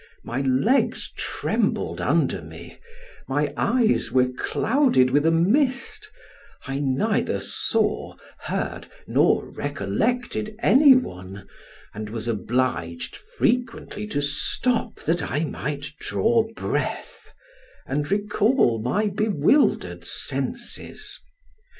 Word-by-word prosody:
my 125 Hz, +4 st, -3 dB
legs 135 Hz, -, +1 dB
trembled -, -, -1 dB
under -, -, +1 dB
me, -, -, -12 dB, 0.5 s
my 145 Hz, +1 st, 0 dB
eyes 235 Hz, -2 st, +2 dB
were 130 Hz, -1 st, +3 dB
clouded 210 Hz, -, +2 dB
with 145 Hz, +4 st, +3 dB
a -, -, +5 dB
mist, 270 Hz, -, +1 dB, 0.6 s
I 135 Hz, +1 st, -3 dB
neither 145 Hz, +10 st, 0 dB
saw, -, -, -1 dB, 0.2 s
heard, -, -, -4 dB, 0.2 s
nor -, -, +3 dB
recollected 220 Hz, -4 st, -2 dB
any 270 Hz, +3 st, +6 dB
one, 95 Hz, -, -4 dB, 0.5 s
and 105 Hz, 0 st, -6 dB
was 115 Hz, +1 st, -5 dB
obliged 110 Hz, -7 st, -2 dB
frequently 235 Hz, -3 st, -2 dB
to 145 Hz, -9 st, -2 dB
stop 225 Hz, -, 0 dB
that 165 Hz, +1 st, 0 dB
I 150 Hz, -, 0 dB
might 145 Hz, -1 st, -4 dB
draw 230 Hz, -1 st, +1 dB
breath, -, -, -3 dB, 0.6 s
and 145 Hz, +2 st, -2 dB
recall 205 Hz, -, +2 dB
my 200 Hz, -, 0 dB
bewildered 210 Hz, -, +2 dB
senses. -, -, -4 dB
165 Hz, 100 wpm, -24 LUFS, -, 0.6 s, any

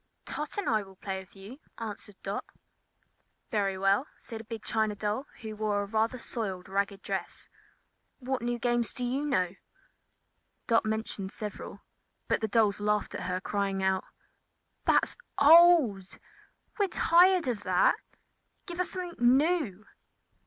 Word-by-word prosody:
"Tot 300 Hz, +5 st, -5 dB
and 405 Hz, -, -2 dB
I 220 Hz, -2 st, +2 dB
will 195 Hz, -1 st, -13 dB
play 190 Hz, 0 st, -4 dB
with 190 Hz, +1 st, -14 dB
you," 200 Hz, +8 st, -11 dB, 0.2 s
answered 210 Hz, -2 st, -7 dB
Dot. -, -, -3 dB, 1.1 s
"Very 195 Hz, -3 st, 0 dB
well," 195 Hz, +8 st, +2 dB
said 225 Hz, -2 st, -8 dB
a -, -, -15 dB
big 225 Hz, -1 st, -7 dB
China 220 Hz, -2 st, 0 dB
doll 210 Hz, +6 st, -2 dB, 0.2 s
which 220 Hz, -1 st, -5 dB
wore 210 Hz, -1 st, 0 dB
a -, -, -4 dB
rather 220 Hz, +4 st, 0 dB
soiled 195 Hz, -7 st, -4 dB
and 190 Hz, -, -13 dB
ragged 200 Hz, 0 st, -1 dB
dress. -, -, -5 dB, 0.7 s
"What 265 Hz, 0 st, -3 dB
new 240 Hz, 0 st, -1 dB
games 240 Hz, -1 st, 0 dB
do 250 Hz, -, -3 dB
you 260 Hz, +4 st, -1 dB
know?" 185 Hz, -10 st, +1 dB, 1.1 s
Dot 230 Hz, -2 st, +3 dB
mentioned 215 Hz, -3 st, -3 dB
several; 210 Hz, -1 st, -6 dB, 0.5 s
but -, -, +1 dB
the 220 Hz, -, 0 dB
dolls 210 Hz, -1 st, +2 dB
laughed 210 Hz, 0 st, 0 dB
at -, -, -4 dB
her, 185 Hz, 0 st, -1 dB
crying 195 Hz, 0 st, -1 dB
out: 190 Hz, 0 st, +1 dB, 0.8 s
"That's -, -, +3 dB, 0.2 s
old! 290 Hz, -, +6 dB, 0.6 s
We're 405 Hz, -, +3 dB
tired 355 Hz, -1 st, +4 dB
of 235 Hz, -5 st, -1 dB
that! -, -, +4 dB, 0.7 s
Give 345 Hz, 0 st, -7 dB
us 365 Hz, -, 0 dB
something 340 Hz, -9 st, +2 dB
new!" 285 Hz, -, 0 dB
220 Hz, 150 wpm, -29 LUFS, 200-260 Hz, 1.1 s, old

